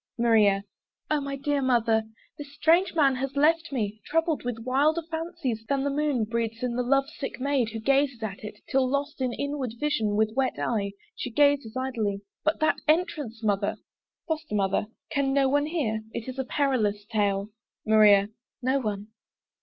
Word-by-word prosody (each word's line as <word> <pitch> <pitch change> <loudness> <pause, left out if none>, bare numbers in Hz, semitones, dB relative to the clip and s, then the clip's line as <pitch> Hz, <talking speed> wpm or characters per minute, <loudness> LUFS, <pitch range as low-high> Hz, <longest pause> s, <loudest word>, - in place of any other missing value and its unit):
MARIA. 215 -4 +4 0.5
O 300 -1 +2
my 280 0 -4
dear 280 +1 -1
Mother! 235 -4 +3 0.3
this 290 -1 -9
strange 335 +5 +3
man 275 -5 +4
has 270 +2 -3
left 325 +3 +3
me 215 -5 -3
Troubled 325 0 0
with 245 -2 -3
wilder 295 +6 +2
fancies, 320 -9 -3
than 275 -1 +1
the 285 - 0
moon 285 -4 +1
Breeds 230 +1 -3
in 245 -1 -1
the 250 - +1
love 275 +2 +2
sick 280 -3 -6
maid 265 -3 +1
who 225 0 -5
gazes 270 0 +1
at 200 -2 -5
it, 210 0 -7
Till 260 -1 +2
lost 280 +1 -2
in 255 -1 0
inward 275 -3 -3
vision, 255 -9 0
with 220 0 +1
wet 265 -1 0
eye 200 -4 -1 0.2
She - - -4
gazes 280 -2 +2
idly! 225 -7 -2 0.2
But 310 +1 +1
that 310 - +3
entrance, 305 -8 0
Mother! 205 -1 0 0.5
FOSTER 315 -7 -3
MOTHER. 195 +1 +1 0.2
Can 275 -1 +1
no 275 -1 +3
one 290 +2 +2
hear? 260 -10 -1
It 225 - -5
is 260 +1 -6
a 265 - -1
perilous 220 -8 0
tale! 205 -2 0 0.4
MARIA. 210 -2 +6 0.3
No 260 +2 +1
one. 210 -3 -4
260 Hz, 175 wpm, -27 LUFS, 220-285 Hz, 0.5 s, MARIA